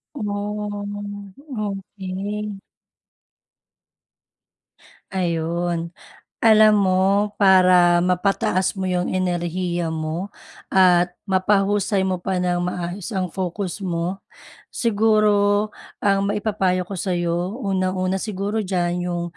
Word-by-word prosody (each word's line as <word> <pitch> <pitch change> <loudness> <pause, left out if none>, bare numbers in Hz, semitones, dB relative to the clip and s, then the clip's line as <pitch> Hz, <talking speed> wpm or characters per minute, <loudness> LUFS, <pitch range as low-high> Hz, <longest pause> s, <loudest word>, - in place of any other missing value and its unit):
Oh, 205 -2 -5 0.3
okey. 200 +1 -5 2.6
Ayun. 170 -1 -1 0.5
Alam 215 -1 +7
mo, 185 -2 +2 0.4
para 185 -3 +6
mapataas 185 +1 +1
mo 190 - -3
yung 180 -1 0
enerhiya 175 -1 -1
mo, 160 +4 -3 0.4
at 180 -1 +4
mapahusay 195 +1 +2
mo 185 -1 -1
pa 190 +1 -2
nang 180 -1 0
maayos 180 +2 -4
ang 185 -4 -2
focus 185 +1 -3
mo, 180 +1 -2 0.5
siguro 210 -2 +2 0.3
ang 195 -1 +2
maipapayo 200 -3 0
ko 195 - -5
sa'yo, 175 +3 -1
unang-una 185 -1 0
siguro 205 +2 -2
diyan, 180 -1 -1
yung 175 -1 -2
190 Hz, 90 wpm, -22 LUFS, 180-205 Hz, 2.6 s, Alam